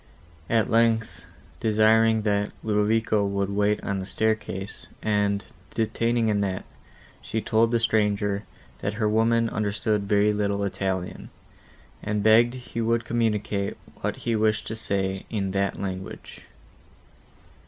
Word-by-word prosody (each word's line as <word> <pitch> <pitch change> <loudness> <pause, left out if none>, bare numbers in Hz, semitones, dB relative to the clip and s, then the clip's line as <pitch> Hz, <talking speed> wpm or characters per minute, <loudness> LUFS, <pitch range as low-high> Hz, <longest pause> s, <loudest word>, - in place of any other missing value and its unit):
At 115 -2 +3
length, 115 -1 +1 0.3
desiring, 110 0 +4
that 105 -1 0
Ludovico 110 0 +2
would 100 0 -1
wait 105 +1 +1
on 100 -1 -2
the 95 - -5
staircase, 110 -3 -2 0.2
and 105 -1 +1 0.3
detaining 115 +1 +1
Annette, 100 -3 0 0.6
she 110 - -3
told 110 +2 +2
the 120 0 +2
stranger, 105 -3 +1 0.4
that 100 - -3
her 110 -1 +1
woman 115 +2 +3
understood 105 -1 -1
very 105 0 +4
little 100 -1 0
Italian, 95 -2 -3 0.7
and 105 -1 -1
begged 115 +3 +5
he 120 -2 -5
would 115 0 +1
communicate 105 -4 -1 0.2
what - - -2
he 115 - -1
wished 110 0 +1
to 110 - -3
say, 95 -3 -2
in 100 -4 -2
that 100 0 -1
language. 95 -1 -6
105 Hz, 125 wpm, -25 LUFS, 100-110 Hz, 0.7 s, begged